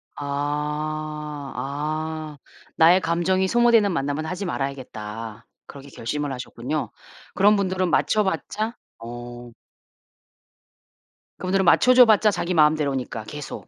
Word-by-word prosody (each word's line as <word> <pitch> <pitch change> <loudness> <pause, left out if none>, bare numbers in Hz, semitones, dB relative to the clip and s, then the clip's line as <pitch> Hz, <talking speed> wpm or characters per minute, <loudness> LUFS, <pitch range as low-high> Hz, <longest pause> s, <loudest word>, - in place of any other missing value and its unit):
아. 145 +1 -2 0.8
아 155 +2 -4 0.4
'나의 170 +3 +6
감정이 185 +3 +1
소모되는 235 -2 +4
만남은 145 -1 -2
하지 185 +4 -4
말아야겠다.' 115 - -5 0.2
그렇게 140 0 -11
결심을 145 +3 -4
하셨군요. 125 +4 -4 0.4
그런 205 +2 +5
분들은 185 -2 0
맞춰 215 +4 +2
봤자 215 +4 -3 0.2
어. 120 +1 -9 1.9
그분들은 190 +1 0
맞춰 250 +8 +5
줘 250 0 +8
봤자 215 -1 +4
자기 180 -2 -2
마음대로니까 145 -7 +1
계속 150 +4 -8
155 Hz, 265 characters per minute, -23 LUFS, 140-190 Hz, 1.9 s, 줘